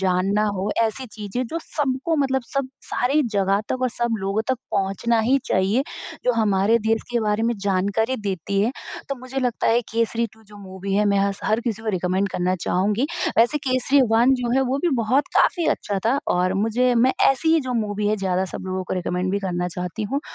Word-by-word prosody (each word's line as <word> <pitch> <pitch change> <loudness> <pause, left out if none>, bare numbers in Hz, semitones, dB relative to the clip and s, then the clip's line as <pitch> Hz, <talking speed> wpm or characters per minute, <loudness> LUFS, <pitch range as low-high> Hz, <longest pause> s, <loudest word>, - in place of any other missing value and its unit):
जानना 195 +3 +1
हो, 195 +3 -2
ऐसी 230 +4 -1
चीज़ें 215 +3 -4
जो 330 +7 -4
सबको 275 +2 -1
मतलब 265 -2 +1
सब 275 -1 -2
सारे 275 +5 +1
जगह 195 +1 +2
तक 255 0 -2
और 255 - +2
सब 235 -1 0
लोगों 195 +2 -1
तक 260 - +3 0.2
पहुँचना 195 +4 +1
ही 265 +3 +4
चाहिए, 195 +8 +2 0.4
जो 250 - +3
हमारे 215 0 +2
देश 225 0 +2
के 240 -1 +1
बारे 210 0 0
में 235 +1 +1
जानकारी 200 +5 0
देती 200 -2 -2
है, 235 +4 +1 0.4
तो 275 - -1
मुझे 255 +1 -6
लगता 245 -2 -1
है, 235 +1 +4
केसरी 230 +1 +1
2। 220 - -21
जो 205 0 -15
मूवी 195 0 -5
है, 210 - +3
मैं 200 - +2
हस 200 0 0
हर 220 +2 +1
किसी 225 -2 -3
को 225 - -4
रिकमेंड 185 +3 0
करना 180 0 0
चाहूँगी। 205 +8 +1 0.3
वैसे 240 +6 +4
केसरी 255 +2 +3
1 240 +4 +5
जो 240 -1 -1
है, - - +4
वो 265 +1 -1
भी 350 - +3
बहुत 255 +6 +1
काफ़ी 340 -3 +3
अच्छा 200 -1 -3
था 265 +4 +3 0.2
और 185 +1 +1
मुझे 245 +3 +2
मैं 250 +3 +4 0.2
ऐसी 320 +4 +2
ही 325 - +3
जो 250 - -1
मूवी 205 0 -2
है, 215 - +1
ज़्यादा 190 -1 0
सब - - -8
लोगों 185 0 -2
को - - -3
रिकमेंड 180 +1 -2
भी 200 - +1
करना 180 -2 -2
चाहती 180 +3 -4
हूँ 270 +7 -2
220 Hz, 210 wpm, -22 LUFS, 195-250 Hz, 0.4 s, 1